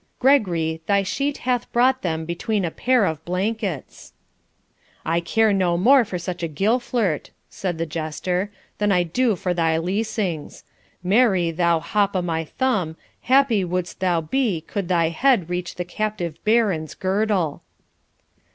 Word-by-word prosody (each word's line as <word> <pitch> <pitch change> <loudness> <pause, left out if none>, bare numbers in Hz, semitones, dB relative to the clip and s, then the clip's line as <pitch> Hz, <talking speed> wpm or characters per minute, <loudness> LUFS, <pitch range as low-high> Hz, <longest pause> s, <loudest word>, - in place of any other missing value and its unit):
Gregory, 175 - +2
thy 200 -1 +3
sheet 280 +9 -2
hath 250 -2 0
brought 260 +2 +3
them 160 -2 -2
between 185 +4 -1
a 165 - -2
pair 250 +1 +2
of 160 -3 -3
blankets.' 185 - -3 0.9
'I 165 +1 +1
care 215 +5 +2
no 180 -3 +1
more 255 +8 +6
for 195 -4 -5
such 175 0 -5
a 165 - -1
gillflirt,' 215 - 0 0.2
said 180 -4 -3
the 165 - -1
jester,' 170 +4 -2 0.3
than 205 -1 +2
I 180 -2 +3
do 220 +6 +1
for 180 0 -2
thy 165 -2 +1
leasings. 185 -2 -3 0.4
Marry, 190 -4 +3
thou 170 0 +2
hop 200 +3 0
o' 185 - +2
my 165 -2 -2
thumb, 190 - -1 0.2
happy 255 -6 +3
wouldst 180 0 -3
thou 180 -3 +1
be 200 - 0
could 195 +2 -4
thy 170 -3 +2
head 185 -1 +2
reach 180 0 -3
the 180 - -4
captive 180 -4 -4
Baron's 210 -8 +1
girdle.' 190 -5 0
185 Hz, 150 wpm, -22 LUFS, 170-220 Hz, 0.9 s, more